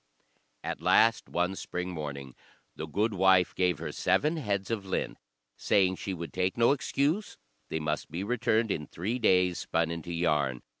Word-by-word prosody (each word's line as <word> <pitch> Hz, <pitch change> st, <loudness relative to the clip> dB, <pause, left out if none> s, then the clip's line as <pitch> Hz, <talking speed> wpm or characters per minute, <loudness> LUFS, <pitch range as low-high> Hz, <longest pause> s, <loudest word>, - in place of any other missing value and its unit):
At -, -, -4 dB
last, 115 Hz, 0 st, +4 dB
one 90 Hz, +2 st, 0 dB
spring 90 Hz, -1 st, -4 dB
morning, 70 Hz, -5 st, -6 dB, 0.4 s
the 80 Hz, -, -5 dB
gudewife 95 Hz, -1 st, +3 dB
gave 90 Hz, -3 st, +1 dB
her -, -, -5 dB
seven 155 Hz, +3 st, +1 dB
heads 100 Hz, -7 st, -2 dB
of 110 Hz, -3 st, -2 dB
lint, 95 Hz, -1 st, -3 dB, 0.4 s
saying 95 Hz, -2 st, +2 dB
she 100 Hz, -, -4 dB
would 85 Hz, -1 st, -7 dB
take 95 Hz, +2 st, -1 dB
no 115 Hz, +2 st, +5 dB
excuse; 145 Hz, +7 st, 0 dB, 0.3 s
they 80 Hz, -, -2 dB
must 75 Hz, 0 st, -2 dB
be 85 Hz, +5 st, -4 dB
returned 115 Hz, -1 st, +1 dB
in 75 Hz, -5 st, -3 dB
three 110 Hz, +9 st, -3 dB
days 90 Hz, -5 st, +3 dB
spun 80 Hz, 0 st, 0 dB
into 85 Hz, 0 st, -5 dB
yarn. 75 Hz, -7 st, 0 dB
90 Hz, 160 wpm, -29 LUFS, 85-110 Hz, 0.4 s, no